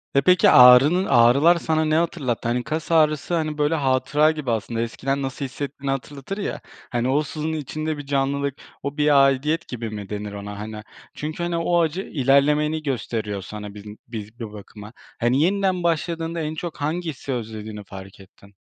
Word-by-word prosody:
E, 140 - +5
peki 180 +5 +5
ağrının 135 +9 +7
ağrılar 135 +9 +5
sana 160 -1 0
ne 155 0 +1
hatırlattı? 155 -9 -1
Hani, 120 +1 0
kas 155 +4 -4
ağrısı, 155 0 +2
hani, 155 -2 -2
böyle, 150 +2 +1
hatıra 145 +2 +2
gibi 150 -6 -3
aslında, 115 +1 -2
eskiden 135 +4 -2
nasıl 135 +1 -4
hissettiğini 140 +1 -5
hatırlatır 140 +7 -5
ya. 200 - -4 0.3
Hani, 120 +1 -1
o 145 +3 +2
sızının 155 +2 -4
içinde 155 +1 -4
bir 145 - -7
canlılık, 140 0 -1 0.3
o 140 +1 -4
bir 150 -2 +5
aidiyet 150 +5 +1
gibi 115 -2 -5
mi 105 -2 -7
denir 105 0 -5
ona, 100 0 -7
hani? 105 0 -7 0.3
Çünkü, 155 +3 -5
hani, 175 -1 -1
o 175 +1 +1
acı 165 +3 -1
ilerlemeni 150 +1 +2
gösteriyor 110 -7 -3
sana 105 +1 -8
biz 105 0 -11
m 105 0 -9
biz 110 0 -8
bir 115 -3 -6
bakıma. 105 +1 -11 0.3
Hani, 120 +4 +2
yeniden 190 0 +1
başladığında 165 0 -1
en 155 0 -3
çok 170 +1 -6
hangisi 155 -3 -3
özlediğini 110 -3 -6
fark 95 0 -11
ettin. 100 +1 -18
140 Hz, 175 wpm, -23 LUFS, 115-155 Hz, 0.3 s, ağrının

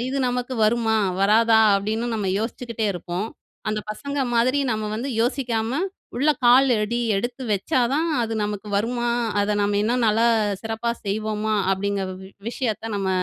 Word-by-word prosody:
அஇது 260 +3 -2
நமக்கு 250 +1 -2
வருமா? 225 0 +2 0.2
வராதா? 220 +2 +5 0.2
அப்டீன்னு 220 +4 -2
நம்ம 205 -3 -2
யோசிச்சுக்கிட்டே 230 -1 -3
இருப்போம். 175 +3 -4 0.4
அந்த 215 0 -1
பசங்க 280 +6 -5 0.2
மாதிரி 255 +4 +3
நம்ப 215 -1 -1
வந்து 245 +5 -3
யோசிக்காம 245 +1 0 0.4
உள்ள 295 +4 +3 0.2
கால் 260 +2 +6
அடி 235 +3 -1 0.2
எடுத்து 240 +5 -3
வச்சா 205 +6 +1
தான், 325 +3 +1
அது 225 -1 -2
நமக்கு 210 0 -5
வருமா? 240 +3 -1 0.3
அத 205 0 0
நம்ம 205 0 +1
இன்னும் 240 +2 +1
நல்லா 225 +2 +3 0.3
சிறப்பா 225 +1 -2
செய்வோமா? 215 +1 -1 0.2
அப்பிடிங்கிற 195 0 -1
வ - - -8 0.3
விஷயத்த 225 -3 -3
நம்ப 195 -1 -1
225 Hz, 150 wpm, -23 LUFS, 210-245 Hz, 0.4 s, கால்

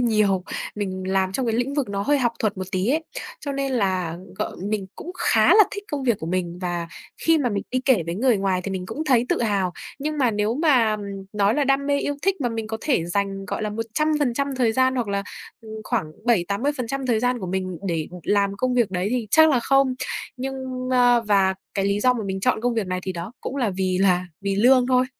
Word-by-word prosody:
nhiều, 210 -6 +2 0.3
mình 190 -3 -3
làm 190 0 +1
trong 255 +4 -1
cái 225 - +1
lĩnh 245 +4 -1
vực 285 -6 -1
nó 200 0 -2
hơi 290 +5 +2
học 240 -2 +1
thuật 215 -2 0
một 185 - -2
tí 185 +3 0
ấy. 315 +5 +1 0.4
Cho 280 - -4
nên 275 -1 -2
là 185 -7 0 0.2
g - - +1 0.3
mình 210 -3 -2
cũng 355 - -8
khá - - +4
là 425 -1 +8
thích 405 0 -6
công 285 -2 -2
việc 235 -5 +2
của 160 - -4
mình 175 0 -2
và 175 -2 -3 0.3
khi 325 -1 +4
mà 270 -4 +1
mình 200 -1 -1
đi 255 0 0
kể 250 -10 +4
với 170 - -2
người 240 +3 +3
ngoài 195 -2 0
thì 195 - -4
mình 185 -1 -4
cũng 310 +10 -4
thấy 250 -5 +3
tự - - +1
hào. 200 -5 0 0.3
Nhưng 300 +1 -3
mà 250 -4 +3
nếu 210 +2 0
mà 255 -8 +3 0.4
nói 205 0 +2
là 290 - +2
đam 275 +1 +1
mê, 285 0 +2
yêu 285 - -1
thích 390 -3 +1
mà 245 - +1
mình 225 -1 -4
có 220 0 -3
thể 260 - +1
dành, 195 +1 -2
gọi - - -3
là, 210 - -1
100% 280 +4 0
thời 235 -3 +2
gian 260 +2 +2
hoặc 245 -4 -1
là, 200 0 -1 0.4
ờ, 220 - -13 0.2
khoảng 155 0 -2
7, 225 -8 +3
80% 260 +4 -2
thời 230 -3 +2
gian 250 +1 +1
của 185 - -5
mình 185 -1 -3
để 165 -3 -1 0.2
làm 200 +1 +1
công 250 +3 0
việc 235 -6 +2
đấy 180 +1 -1
thì 245 -2 -1
chắc 315 0 +6
là 260 -4 +3
không. 270 +1 +3 0.4
Nhưng 260 -1 -4
ơ, 245 -1 +5
và 195 -2 +3 0.2
cái 195 -1 0
lý 200 +1 +1
do 250 +3 +4
mà 225 -4 -4
mình 190 0 -3
chọn 250 0 +1
công 245 0 0
việc 220 -4 -1
này 185 0 -2
thì 190 - -3
đó 175 +5 -6
cũng 275 - -5
là 240 -6 +1
vì 185 -1 -1
là 185 -2 +3
vì 200 0 -1
lương 250 +4 +5
thôi. 255 0 +3
225 Hz, 245 wpm, -23 LUFS, 195-260 Hz, 0.4 s, là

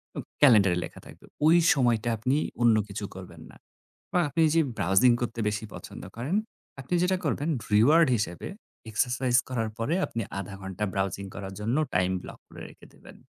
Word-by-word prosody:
উম - - -4 0.2
Calender-এ 105 -10 +6
লেখা - - -12
থাকবে। - - -15 0.2
ওই 165 +2 +6 0.2
সময়টা 120 -4 +1
আপনি 125 +6 0 0.2
অন্য 120 -2 +5
কিছু 100 +1 -5
করবেন 90 -4 -11
না। - - -17 0.6
বা 180 - +3
আপনি 165 +4 0
যে 165 - +5 0.2
browsing 95 +7 +4
করতে 120 -1 -3
বেশি 105 +1 -4
পছন্দ - - -10
করেন, 135 +10 -2 0.5
আপনি 135 - -6
যেটা 185 +1 +1
করবেন 145 +1 -1 0.2
reward 150 +10 +5
হিসেবে 90 -5 -4 0.4
exercise 125 +2 +2
করার 115 -4 -2
পরে 145 +9 0
আপনি 115 - -4 0.2
০.৫ 100 0 -7
ঘণ্টা 95 +1 -5
browsing 95 0 -2
করার 95 -1 -6
জন্য 115 +6 -1 0.2
time 90 0 +2
block - - -10
করে - - -12
রেখে - - -17
দেবেন। - - -16
115 Hz, 170 wpm, -27 LUFS, 100-130 Hz, 0.6 s, Calender-এ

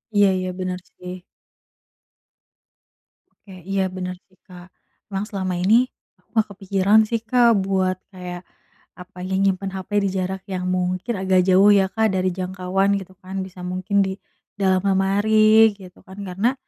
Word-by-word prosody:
Iya 205 -1 +5
iya. 185 0 -3
Benar 185 -1 -3 0.2
sih. 180 0 -9 2.2
Oke. - - -12 0.2
Iya 195 0 +1
benar 180 0 -4
sih 185 - -30
Kak. 180 -1 -13 0.4
Emang 195 +1 -3
selama 190 -3 -3
ini, 225 +8 +3 0.3
aku - - -36
nggak 220 -1 +3
kepikiran 195 +2 +2
sih 230 - 0
Kak, 235 -2 +4
buat 190 -1 0 0.2
kayak, 180 -1 -7 0.6
apa, 180 0 -15
nyimpen 190 0 0
HP 190 -1 -7 0.2
di 195 - +1
jarak 190 +1 -3
yang 180 0 -3
mungkin 185 +5 -1
agak 190 -1 +3
jauh 195 +3 +6
ya 195 -1 +3
Kak, 220 0 0
dari 185 0 +1
jangkauan 185 +1 -1
gitu 190 0 -13
kan, 190 +1 -4
bisa 180 -1 -10
mungkin 185 +3 -2
di 190 - -3 0.5
dalam 185 -1 +3
lemari 215 +3 +4
gitu 185 -3 -15
kan, 190 +1 -13
karena, 200 +6 0
190 Hz, 150 wpm, -22 LUFS, 185-200 Hz, 2.2 s, jauh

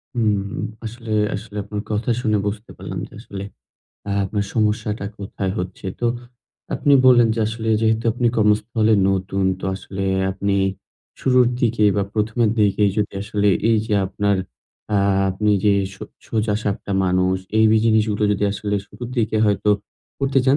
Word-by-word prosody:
হুম, 105 -4 +1 0.4
আসলে 115 0 -7 0.2
আসলে 105 +1 -9
আপনার 105 0 -5
কথা 105 +4 -1
শুনে 110 -3 +1
বুঝতে 105 +2 -5
পারলাম - - -6
যে - - -20
আসলে 100 -4 -7 0.7
আ - - -2
আপনার 100 +1 -2
সমস্যাটা 105 -1 0
কোথায় 95 -1 -3
হচ্ছে। 90 +1 -5
তো 120 - +1 0.7
আপনি 145 - +2
বললেন 120 -2 +6
যে, 115 - -2
আসলে 110 0 -4
যেহেতু 110 0 +1
আপনি 125 0 0
কর্মস্থলে 110 +1 +2 0.2
নতুন, 95 0 -1 0.2
তো - - -6
আসলে 95 0 -5 0.3
আপনি 100 +1 -1 0.7
শুরুর 125 -1 +4
দিকে 115 -2 +2
বা 100 - +2
প্রথমের 110 +1 +1
দিকে 105 0 +2
যদি 105 -2 0
আসলে 105 0 0 0.2
এই 110 - +4
যে 105 - 0
আপনার 100 +1 0 0.6
আ - - +4 0.3
আপনি 105 +3 0
যে 105 -1 +5 0.2
সো - - -12 0.3
সোজাসাপটা 105 -2 -1
মানুষ, 90 0 +2 0.2
এই 110 - +5
বি 110 - +5
জিনিসগুলা 110 -2 +2
যদি 105 0 0
আসলে 105 0 -3
শুরুর 120 +3 -8
দিকে 110 -1 +1
হয়তো 105 0 +2 0.5
করতে 135 -1 +1
চান, 135 +2 +4
105 Hz, 155 wpm, -21 LUFS, 100-110 Hz, 0.7 s, বললেন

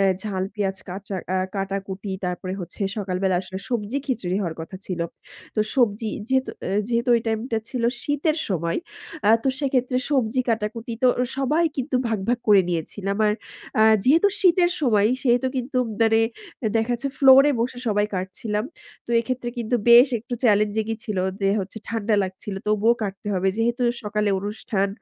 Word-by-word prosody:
এ - - +4 0.2
ঝাল, 190 -3 -2
পেঁয়াজ 195 -2 -2
কাচা 190 +2 -5 0.2
আ - - +2 0.2
কাটাকুটি 195 0 -4
তারপরে 180 +1 -3
হচ্ছে 180 +3 -7
সকালবেলা 190 -2 0
আসলে 190 0 -7
সবজি 240 +2 -1
খিচুড়ি 195 -9 -1
হওয়ার 170 -4 -3
কথা 165 +4 -7
ছিল। 180 -2 -3 0.5
তো 215 - +1 0.2
সবজি 225 -3 +2 0.2
যেহেতু 260 0 +1 0.2
আ - - -2 0.2
যেহেতু 235 +1 0
ওই 230 - 0
টাইম 220 -1 0
টা 225 - +2
ছিল 250 -3 -3 0.2
শীতের 295 +2 0
সময় 170 -3 -1 0.5
আ - - +7
তো 270 - +1
সেক্ষেত্রে 255 -2 +1
সবজি 255 -3 +2
কাটাকুটি 225 +1 -2
তো - - +7
এ - - +2
সবাই 300 +5 +2
কিন্তু 260 0 -1
ভাগ, 220 -2 0
ভাগ 245 0 +2
করে 200 -2 +7
নিয়েছিলাম 190 +4 -2
আর 210 - +3 0.5
আ - - +7 0.2
যেহেতু 325 +9 +5
শীতের 355 -2 +4
সময় 215 -7 +3
সেহেতু 245 0 +3
কিন্তু 255 +1 -1 0.2
মানে 225 0 +4 0.4
এ 220 - +3
দেখাচ্ছে 240 +4 0
ফ্লোর 270 -1 +8
এ - - +2
বসে 245 +1 -2
সবাই 205 -1 +2
কাটছিলাম। 210 +3 -3 0.4
তো 235 - -1
এক্ষেত্রে 250 0 -3
কিন্তু 235 0 -4 0.2
বেশ 240 +4 +9
একটু 245 +2 -5
চ্যালেঞ্জিং 210 -1 +3
ই - - -10
ছিল 205 -4 -3 0.2
যে 195 - +2
হচ্ছে 195 +3 -6
ঠান্ডা 225 -1 0
লাগছিল 190 +2 -6
তবুও 215 +3 +3
কাটতে 200 0 -4
হবে। 190 +1 +1
যেহেতু 235 +2 +1 0.2
সকালে 210 0 -1
অনুষ্ঠান। 205 -1 -2
220 Hz, 175 wpm, -23 LUFS, 195-245 Hz, 0.5 s, বেশ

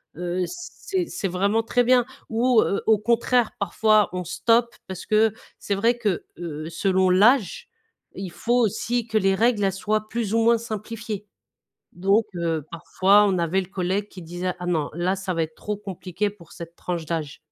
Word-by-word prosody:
heu, 180 +2 -2
c'est 360 +1 -4
c'est 195 - -3
vraiment 200 +5 +1
très 245 +2 +2
bien. 245 0 +4 0.2
Ou, 235 0 +3
heu, 200 - 0
au 220 - +5
contraire 235 +2 +2
parfois 210 +1 +3
on 180 0 -3
stoppe 235 +7 +1
parce 190 -1 -7
que 215 0 +3 0.3
c'est 200 - -2
vrai 230 +5 +2
que, 205 -7 -1 0.2
heu, 155 -2 -5
selon 185 +2 +1
l'âge 220 - +3 0.5
il 190 -3 -6
faut 240 +7 -1
aussi 235 +2 0
que 220 -1 -1
les 195 -1 +2
règles 225 0 +2
elles 195 - +2
soient 215 +2 -1
plus 225 -3 -2
ou 230 - +3
moins 230 +1 +4
simplifiées. 215 -1 -6 0.7
Donc, 195 +5 +2
heu, 165 -3 -1
parfois 190 +4 +3
on 190 -3 +1
avait 170 +3 +1
le 180 - -8
collègue 190 +2 -2
qui 185 - -11
disait: 175 +2 -4
«Ah 180 - -5
non, 160 -4 0
là 175 +3 0
ça 190 -1 -3
va 165 - 0
être 155 0 -8
trop 210 -1 -4
compliqué 195 0 -3
pour 175 -6 -18
cette 170 0 -10
tranche 170 -3 -4
d'âge». 155 -3 -4
200 Hz, 185 wpm, -24 LUFS, 180-225 Hz, 0.7 s, au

